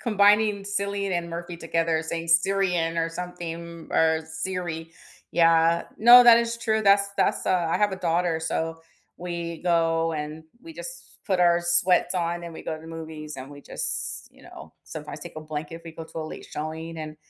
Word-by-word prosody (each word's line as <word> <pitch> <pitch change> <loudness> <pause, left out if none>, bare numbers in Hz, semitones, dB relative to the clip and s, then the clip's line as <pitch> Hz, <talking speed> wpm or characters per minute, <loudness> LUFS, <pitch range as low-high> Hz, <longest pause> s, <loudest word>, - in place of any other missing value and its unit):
combining 210 -2 +3
Cillian 200 -1 -2
and 170 -1 -2
Murphy 170 +1 -6
together 165 -1 0
saying 165 +1 -4
Syrian 170 -1 +2
or 165 - +1
something 170 -1 -7
or 160 0 +3
Siri, 165 0 -4 0.4
yeah 165 0 +4
No, 240 +2 +9
that 235 -1 +9
is 235 0 -1
true, 220 -2 0
that's 200 0 +4
that's, - - +1
uh 180 -2 +2
I - - +2
have 205 -2 +2
a - - -3
daughter, 170 -2 0
so, 165 0 -2 0.4
we 170 -2 -5
go 165 -1 +2
and 155 +1 -5 0.2
we 330 - -10
just - - -10
put 190 -3 +1
our 175 -1 +4
sweats 175 +1 +3
on 175 0 -1
and 170 - -7
we - - -9
go 160 - -3
to 155 - -9
the 160 - -13
movies 155 -2 -7
and 130 +1 -8
we 145 0 -11
just, - - -4
you - - -20
know, - - -12
sometimes - - -8
take - - -10
a 155 - -5
blanket 155 +1 -6
if 165 - -13
we 165 - -8
go 165 - -8
to 160 - -9
a 160 - -3
late - - -8
showing 160 +2 -5
and, 155 -1 -7
170 Hz, 195 wpm, -25 LUFS, 160-190 Hz, 0.4 s, No